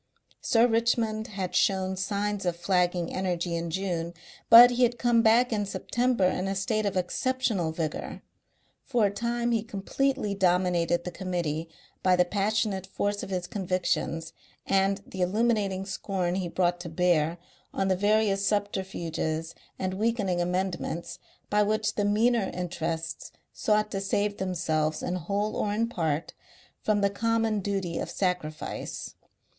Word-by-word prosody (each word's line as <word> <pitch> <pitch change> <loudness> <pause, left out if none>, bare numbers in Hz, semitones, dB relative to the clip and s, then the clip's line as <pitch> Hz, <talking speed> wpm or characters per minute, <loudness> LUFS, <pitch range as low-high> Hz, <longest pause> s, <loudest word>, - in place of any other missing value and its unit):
Sir 230 0 +4
Richmond 225 -2 +1
had 195 -3 -4
shown 190 -1 +2
signs 200 +1 -2
of 175 - 0
flagging 175 -1 0
energy 175 -2 -1
in 170 0 -3
June, 170 -1 -2 0.3
but 240 +2 +11
he 245 +1 -1
had 240 -1 +3
come 240 -1 +3
back 230 +2 +4
in 210 -1 0
September 240 +1 0
in 185 +1 0
a 195 - -1
state 215 +1 0
of 195 - -2
exceptional 205 -2 0
vigour; 160 -1 -4 0.6
for 240 -5 +2
a 200 - +1
time 235 +3 -1
he 225 -2 +2
completely 215 +2 -1
dominated 180 -2 +2
the 180 - -5
Committee 170 -3 -3 0.3
by 185 -1 +4
the 180 0 +4
passionate 200 0 0
force 205 +1 -2
of - - -6
his 180 -2 -2
convictions 175 -3 -2 0.3
and 195 0 +1
the 190 - -6
illuminating 200 -1 +1
scorn 190 -2 -2
he 185 -1 -1
brought 175 0 +1
to 175 -1 -6
bear 170 -1 +2 0.3
on 195 - -1
the 190 - +3
various 205 0 +2
subterfuges 190 -6 -2 0.2
and 185 0 -2
weakening 200 -4 0
amendments 175 -1 -2 0.3
by 210 0 +4
which 215 +1 +1
the 205 - 0
meaner 220 +1 +2
interests 165 -2 -4 0.2
sought 210 0 +1
to 195 - -2
save 205 +1 0
themselves 155 -4 -1
in 180 - -2
whole 200 +5 -2
or 205 - 0
in 225 +3 +1
part 160 -8 -2 0.5
from 210 -1 +1
the 200 - +3
common 225 0 +1
duty 190 -4 -2
of - - -4
sacrifice. 180 -5 -3
195 Hz, 150 wpm, -27 LUFS, 175-215 Hz, 0.6 s, but